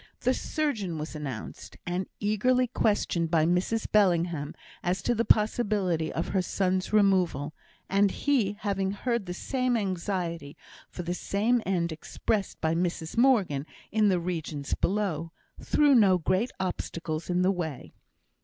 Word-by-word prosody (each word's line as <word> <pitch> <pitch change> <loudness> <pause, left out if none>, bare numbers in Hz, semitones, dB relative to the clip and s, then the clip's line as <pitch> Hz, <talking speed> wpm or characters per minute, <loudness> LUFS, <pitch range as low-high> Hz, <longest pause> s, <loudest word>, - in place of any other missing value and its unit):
The 255 - +2
surgeon 225 - -2
was 155 +1 -5
announced, 140 -7 -7
and 180 +2 -2
eagerly 250 +5 +2
questioned 205 -8 0
by 160 -2 +3
Mrs 180 +6 +1
Bellingham 170 -7 +2 0.3
as 175 0 -1
to 240 - +2
the 230 0 +1
possibility 205 -7 +2
of 165 - -3
her 190 - +1
son's 185 0 -1
removal; 185 -8 +2 0.3
and 200 +1 +3
he, 235 -5 +1
having 195 -2 -1
heard 235 -1 -2
the 180 - -3
same 255 +2 0
anxiety 180 -6 -3 0.3
for 180 - -6
the 175 +1 -2
same 220 +6 +1
end 175 -3 0
expressed 195 +6 -2
by 160 0 +1
Mrs 170 -1 -2
Morgan 205 - +3 0.2
in 215 -1 +3
the 185 -2 +2
regions 160 -5 -3
below, 175 -5 -1 0.3
threw 295 -2 +4
no 200 -7 +6
great 185 +7 0
obstacles 165 -3 -3
in 180 0 +2
the 190 - +4
way. 160 -8 -5
185 Hz, 145 wpm, -28 LUFS, 170-210 Hz, 0.3 s, no